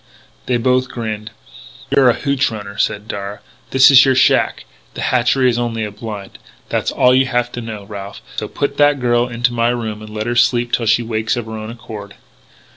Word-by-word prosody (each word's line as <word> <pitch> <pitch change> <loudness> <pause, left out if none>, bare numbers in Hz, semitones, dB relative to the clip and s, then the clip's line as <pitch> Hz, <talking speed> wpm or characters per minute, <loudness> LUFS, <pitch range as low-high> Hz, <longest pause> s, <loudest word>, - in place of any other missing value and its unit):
They 125 - +2
both 130 +1 +1
grinned. 110 -2 -5 0.6
"You're 135 -2 +5
a 120 - +3
hootch 140 -1 0
runner," 100 -2 -7
said 105 +1 -1
Darragh. 100 0 -6 0.3
"This 135 +1 +6
is 135 0 +9
your 130 -1 +3
shack. - - +2 0.3
The - - -5
hatchery 125 +1 +2
is 120 -1 +1
only 115 -2 -2
a 105 - -6
blind. 105 -2 -8 0.3
That's - - -1
all 125 - +3
you 130 +1 +3
have 120 -1 0
to 120 - -6
know, 110 -3 -7
Ralph. 100 -1 -8 0.2
So - - -2
put 140 0 -3
that 145 -1 +4
girl 120 -1 +2
into 120 0 -1
my 115 0 +1
room 110 -3 -3
and 110 - -10
let 110 0 -4
her 120 - -1
sleep 120 0 +2
till 115 - 0
she 115 +2 +3
wakes 110 -1 -1
of 120 - -3
her 110 - -9
own 110 0 -6
accord. 110 -3 -9
120 Hz, 205 wpm, -18 LUFS, 110-125 Hz, 0.6 s, is